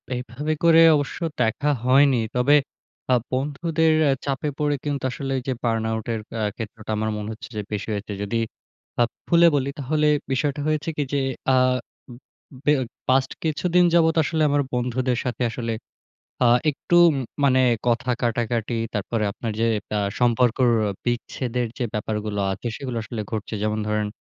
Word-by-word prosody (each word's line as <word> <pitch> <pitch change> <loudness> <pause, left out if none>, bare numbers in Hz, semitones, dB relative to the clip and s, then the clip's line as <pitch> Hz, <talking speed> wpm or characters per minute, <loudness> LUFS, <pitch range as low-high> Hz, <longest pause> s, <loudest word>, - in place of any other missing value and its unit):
এইভাবে 130 +5 -3
করে 165 -1 +7
অবশ্য 145 -2 -2 0.2
দেখা 120 +6 +1 0.2
হয়নি। 135 +1 +5 0.2
তবে 125 +4 +4 0.6
আ - - +6 0.2
বন্ধুদের 155 +4 +1
অ্যা 140 - +4
চাপে 140 +1 -1
পড়ে 150 -1 +1
কিন্তু 145 -2 -2
আসলে 135 +1 -4
যে 130 - +1
বার্ন-আউট 110 -1 -1
এর 110 - -2 0.2
আ - - 0
ক্ষেত্রটা 110 -1 -7
আমার 110 +1 -1
মনে 105 0 -5
হচ্ছে 110 - -10
যে - - -1
বেশি 105 -2 -3
হয়েছে। 105 0 -4
যদি 105 +3 -2 0.6
আপ 120 - +3 0.2
ফুলে 170 0 +6
বলি 140 -1 0
তাহলে 150 +3 +1 0.2
বিষয়টা 140 +2 0
হয়েছে 155 0 0
কি 145 - +1 0.5
আ - - +5 0.5
উম 120 - -10 0.4
উম 130 - -13
বে 150 - +5
অ - - 0 0.3
পাস্ট 130 0 +3
কিছুদিন 175 +3 +2
যাবত 160 -1 +4
আসলে 160 +1 -1
আমার 145 0 +2
বন্ধুদের 125 0 0
সাথে 125 0 -3
আসলে 115 0 -3 0.7
আ - - +5 0.2
একটু 150 +4 -1
উম 155 - 0 0.3
মানে 130 -2 +4 0.3
কথা 120 +1 +1
কাটাকাটি। 120 0 -1 0.2
তারপরে 105 +2 -1
আপনার 115 +2 -5
যে 115 - +3 0.3
আ - - +1 0.2
সম্পর্কর 120 +1 +3 0.4
বিচ্ছেদের 120 0 -2
যে 125 - -1
ব্যাপারগুলো 105 -1 -3
আছে 95 +5 -4
সেইগুলো 130 -4 -5
আসলে 110 +1 -5
ঘটছে। 110 0 -4
যেমন 110 0 0
ধরেন 105 0 0
125 Hz, 160 wpm, -23 LUFS, 115-145 Hz, 0.7 s, করে